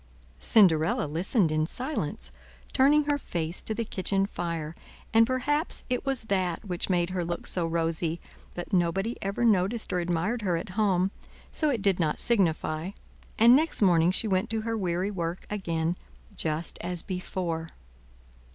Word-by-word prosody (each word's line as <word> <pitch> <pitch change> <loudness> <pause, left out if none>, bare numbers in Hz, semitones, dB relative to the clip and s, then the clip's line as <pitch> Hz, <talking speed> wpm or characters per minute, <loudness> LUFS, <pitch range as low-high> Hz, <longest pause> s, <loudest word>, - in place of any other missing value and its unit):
Cinderella 165 -8 +4
listened 170 - +1
in 155 0 +1
silence, 160 - -4 0.4
turning 290 +3 +5
her 290 0 0
face 170 - -3
to 220 - -3
the 230 0 -2
kitchen 195 -1 0
fire, 165 -5 -4 0.4
and 225 0 +6
perhaps 290 +5 0
it 250 +2 -1
was 270 -3 +1
that 190 -3 -1
which 180 -1 -2
made 175 -1 +1
her 185 -1 -1
look 170 0 -4
so 175 -2 0
rosy, 165 0 -1 0.4
but 175 +2 -6
nobody 190 +6 +1
ever 200 +5 -1
noticed 215 +1 +1
or 180 - +1
admired 175 +7 -1
her 180 -4 0
at 165 - -6
home, 190 -1 +1 0.4
so 310 - +1
it 235 -8 -1
did 195 -3 +2
not 155 -3 0
signify, 170 -6 +1 0.5
and 235 +3 +7
next 315 +3 +1
morning 175 -4 +4
she 190 +4 +3
went 190 -2 0
to 220 0 -1
her 225 +1 -2
weary 185 -1 -1
work 170 -2 -4
again 170 -4 -1 0.4
just 160 +1 -2
as 175 -1 -3
before. 180 -3 -3
185 Hz, 160 wpm, -27 LUFS, 170-220 Hz, 0.5 s, and